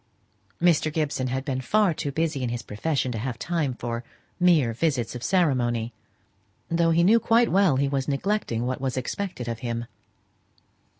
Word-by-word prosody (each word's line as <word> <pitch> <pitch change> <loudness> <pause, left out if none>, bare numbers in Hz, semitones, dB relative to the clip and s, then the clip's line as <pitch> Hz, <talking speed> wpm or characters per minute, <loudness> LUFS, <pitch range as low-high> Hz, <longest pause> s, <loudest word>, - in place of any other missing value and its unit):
Mr. 165 -3 +3
Gibson 145 -4 -1
had 130 +2 -3
been 130 -3 -2
far 205 - +2
too 145 -2 -3
busy 155 -1 -1
in 125 - -1
his 120 0 -4
profession 130 +4 -1
to 115 - -3
have 120 +1 -3
time 155 -4 -1
for 120 0 -4 0.4
mere 165 -10 +4
visits 125 -3 -1
of 125 - -6
ceremony, 120 - +1 0.8
though 165 0 +3
he 165 +1 +3
knew 220 +6 +6
quite 230 +1 +3
well 190 -7 +4
he 140 +1 +1
was 135 -1 -1
neglecting 140 - -1
what 130 +1 -3
was 135 -1 -2
expected 130 -1 -4
of 115 -1 -3
him. 120 -1 -3
135 Hz, 170 wpm, -25 LUFS, 120-170 Hz, 0.8 s, knew